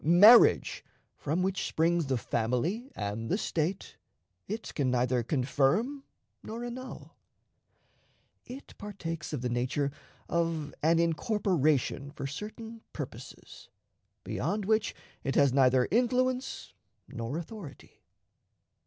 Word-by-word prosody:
Marriage, 205 +9 +7 0.3
from 160 +5 -1
which 190 0 -1
springs 165 -1 +1
the 130 -2 +1
family 125 - -1
and 105 +2 -4
the 190 - +2
State, 175 -1 -2 0.5
it 220 +2 -5
can 140 -4 0
neither 125 0 +2
confirm 145 - +1 0.4
nor 230 +2 -6
annul. 255 +2 -8 1.3
It 260 +3 -10
partakes 175 -6 -5
of 145 -5 -3
the - - +1
nature 130 +4 0 0.4
of 165 -3 -1
an 165 +2 +4
incorporation 165 - +1
for 140 - -7
certain 220 - -7
purposes, - - -9 0.5
beyond 205 -1 -2
which 215 +1 +1 0.3
it 135 - -1
has 140 -3 +4
neither 130 -2 +4
influence 255 +3 0 0.3
nor 115 +6 -4
authority. 170 - -9
165 Hz, 110 wpm, -30 LUFS, 135-215 Hz, 1.3 s, Marriage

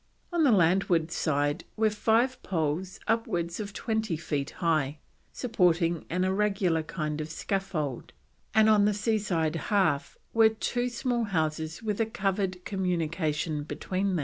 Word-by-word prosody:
On 340 -2 +3
the 275 - +5
landward 175 -3 +3
side 145 -1 0
were 220 0 +3
five 230 +5 +2
poles 170 +2 -2
upwards 175 -6 0
of 205 -1 -4
twenty 220 -4 -1
feet 150 -3 -2
high, 155 -4 0 0.3
supporting 175 -8 +1
an 180 +2 0
irregular 190 -3 +1
kind 155 -1 -3
of 155 - -5
scaffold, 165 - -3 0.4
and 220 0 +6
on 210 -2 +5
the 210 -1 +2
sea 215 +1 +1
side 165 -6 0
half 190 -9 +1 0.2
were 225 -1 +6
two 245 +3 -1
small 240 -1 -1
houses 160 -2 -2
with 215 0 -1
a 225 - +1
covered 195 -3 -2
communication 165 -5 -1
between. 185 +5 -2
185 Hz, 140 wpm, -28 LUFS, 160-215 Hz, 0.4 s, and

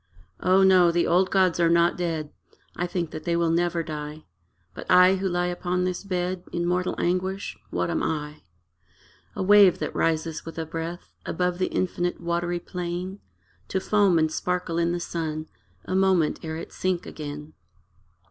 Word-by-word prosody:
O 185 +1 +4
no, 185 -2 +6
the 170 0 +2
old 185 +2 +3
gods 185 -3 +2
are 170 -1 +4
not 170 0 +4
dead: 165 -4 -3 0.4
I 175 - -1
think 175 -2 -3
that 155 - -7
they 170 - 0
will 170 -1 +2
never 170 0 +1
die; 150 -1 -7 0.5
But, - - -9
I, 180 +1 +6
who 190 0 -1
lie 175 0 0
upon 180 0 -1
this 180 +1 -2
bed 180 -1 -2
In 170 0 -1
mortal 180 +1 0
anguish 185 +2 -1
what 170 - -1
am 165 - 0
I? 150 -1 -3 0.9
A 200 - -2
wave 200 -1 +7
that - - -4
rises 160 0 0
with 165 - -9
a 165 - -2
breath 165 +2 -6
Above 180 0 -1
the 185 - +1
infinite 175 -1 -1
watery 175 +1 -1
plain, 180 +2 -5 0.5
To 190 - -1
foam 200 -2 +3
and 160 -1 +2
sparkle 180 -1 -1
in 170 0 +1
the 175 - -1
sun 160 -2 -3 0.4
A - - -4
moment 190 -4 +2
ere 160 -1 -5
it 165 - -8
sink 185 -1 -1
again. 150 0 -7
175 Hz, 175 wpm, -25 LUFS, 165-185 Hz, 0.9 s, wave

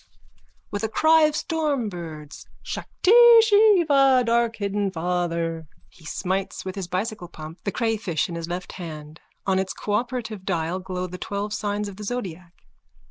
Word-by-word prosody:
(With 205 - -3
a 220 - 0
cry 315 +7 +5
of 305 - -3
stormbirds.) 205 - -3 0.2
Shakti 375 - -1 0.3
Shiva, 340 - +5
darkhidden 220 -4 0
Father! 170 -2 -2 0.3
_(He 160 - -14
smites 190 +2 -3
with 185 - -4
his 190 -2 -5
bicycle 185 +1 -3
pump 160 0 -11
the 200 - 0
crayfish 220 -9 -1
in 175 - -7
his 165 0 -5
left 180 +1 -5
hand. 155 -3 -9 0.2
On 190 -1 +2
its 190 0 -2
cooperative 220 -1 -3
dial 175 -1 -1
glow 185 -1 -4
the 180 0 -8
twelve 205 +1 -3
signs 205 0 -2
of 195 -2 -9
the 210 - -7
zodiac. 185 -7 -6
195 Hz, 145 wpm, -24 LUFS, 175-230 Hz, 0.3 s, cry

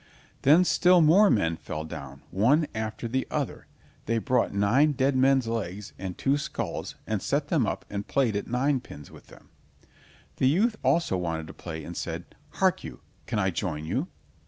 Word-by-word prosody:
Then 160 +7 +6
still 180 0 +5
more 175 +6 +6
men 85 - +1
fell 75 - -5
down, 70 -3 -9
one 125 - +3
after 110 +1 -4
the 130 +3 -1
other; - - -3 0.4
they 115 +1 +1
brought 125 +1 +1
nine 120 +10 +3
dead 135 0 +1
men's 130 -1 +3
legs 105 -3 -4
and 95 -2 -5
two 140 +2 +1
skulls, 115 - -4
and - - -2
set - - -1
them - - +2
up - - -3
and 100 0 -5
played 125 -6 +1
at 100 - -2
ninepins 125 - -2
with - - -15
them. - - -17 0.9
The 130 - +3
youth 210 - +2
also 165 - +2
wanted 80 -3 -3
to 80 - -10
play 80 -2 -7
and 85 +3 -8
said: 85 +1 -5 0.2
"Hark - - +1
you, - - -9 0.3
can 110 - -2
I 95 -2 +1
join 80 -3 -3
you?" - - -1
115 Hz, 180 wpm, -27 LUFS, 90-140 Hz, 0.9 s, Then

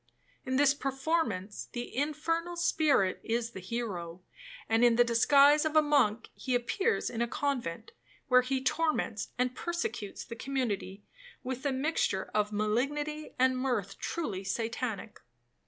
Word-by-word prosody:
In 260 - 0
this 275 0 +5
performance 270 - -2
the 240 0 -5
infernal 330 +5 -1
spirit 310 - +2
is 230 0 -1
the 190 - -8
hero, 185 -4 -5 0.4
and 225 +1 +3
in 240 -1 +6
the 240 - +6
disguise 280 +5 +5
of 315 -1 -1
a 310 - +8
monk 250 -7 +2
he 255 -2 -2
appears 385 - 0
in 230 - -3
a 235 - +1
convent, 260 - -3 0.4
where 250 -1 +6
he 260 +1 -2
torments 305 -8 0
and 250 0 +1
persecutes 345 - -4
the 230 - -7
community 225 -7 -3 0.4
with 260 +2 -3
a - - +1
mixture 265 -8 0
of 210 0 +1
malignity 280 +9 -1
and 260 0 +3
mirth 225 -7 -2
truly 215 - -3
Satanic. 225 0 -3
255 Hz, 140 wpm, -30 LUFS, 225-290 Hz, 0.4 s, a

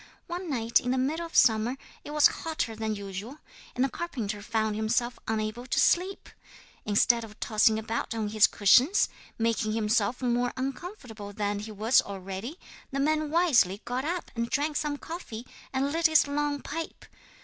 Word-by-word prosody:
'One 350 0 -5
night 235 -4 +2
in 250 - -4
the 260 - +1
middle 310 +6 -1
of 330 - -15
summer 225 +3 +4 0.3
it - - -9
was 300 0 +3 0.2
hotter 315 -9 -2
than 220 0 -2
usual, 200 +6 -7 0.4
and 250 - +1
the - - +3
carpenter 230 -11 -4
found 220 -1 -1
himself 235 +3 0
unable 220 +3 -2
to - - +1
sleep. 370 +3 +2 0.6
Instead 230 +3 +3
of 215 -1 -12
tossing 220 0 +3
about 225 +1 -3
on 215 -2 -2
his 215 0 +5
cushions, 255 - +4 0.3
making 225 -1 0
himself 220 +1 +1
more 245 -1 0
uncomfortable 255 - -6
than 205 -1 -1
he 215 +1 -7
was 220 +5 +3
already, 195 - -6 0.3
the 275 - -3
man 310 +1 +1
wisely 290 - +3
got 250 +2 -2
up 345 +4 -3
and 235 0 -2
drank 295 +1 0
some 290 -1 -1
coffee 280 -9 -7 0.3
and 275 +1 0
lit 330 +1 +3
his 315 -2 +4
long 290 0 -1
pipe. 325 +2 -6
240 Hz, 170 wpm, -28 LUFS, 215-295 Hz, 0.6 s, his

